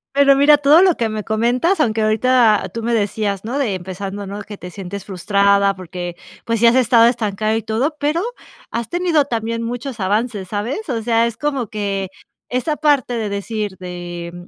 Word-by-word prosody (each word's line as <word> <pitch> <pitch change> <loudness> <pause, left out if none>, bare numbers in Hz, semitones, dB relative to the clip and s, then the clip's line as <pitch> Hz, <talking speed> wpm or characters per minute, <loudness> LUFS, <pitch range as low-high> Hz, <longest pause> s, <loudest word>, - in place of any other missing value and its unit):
Pero 280 -1 +6
mira, 290 +2 +6
todo 290 +4 +6
lo 370 -3 +4
que 230 - 0
me 215 -1 -4
comentas, 245 - +1
aunque 225 -7 +1
ahorita 220 -2 +3
tú 230 - -5
me 235 +1 0
decías, 205 -2 -1
no 245 +5 -3
de 240 -9 0
empezando, 190 +2 -6
¿no?, 200 +2 -6
que 205 0 -9
te 180 - -9
sientes 195 +1 -7
frustrada, 200 +1 +2
porque, 175 -1 -7 0.3
pues, 230 -1 -1
sí 235 - +5
has 230 - +5
estado 240 -2 +5
estancada 215 -2 0
y 225 - -2
todo, 250 +9 -1
pero 300 +4 0 0.5
has 230 -1 -3
tenido 345 -4 +2
también 230 -2 -3
muchos 245 0 -5
avances, 205 0 -1
¿sabes? 235 - -3
O 235 -3 -1
sea, 230 0 +2
es 230 -1 -6
como 275 -4 -2
que 200 -2 -3 0.4
esa 255 +5 -1
parte 285 -5 +2
de 225 -3 -2
decir 200 0 -4
de 175 -1 -7
220 Hz, 185 wpm, -19 LUFS, 200-255 Hz, 0.5 s, Pero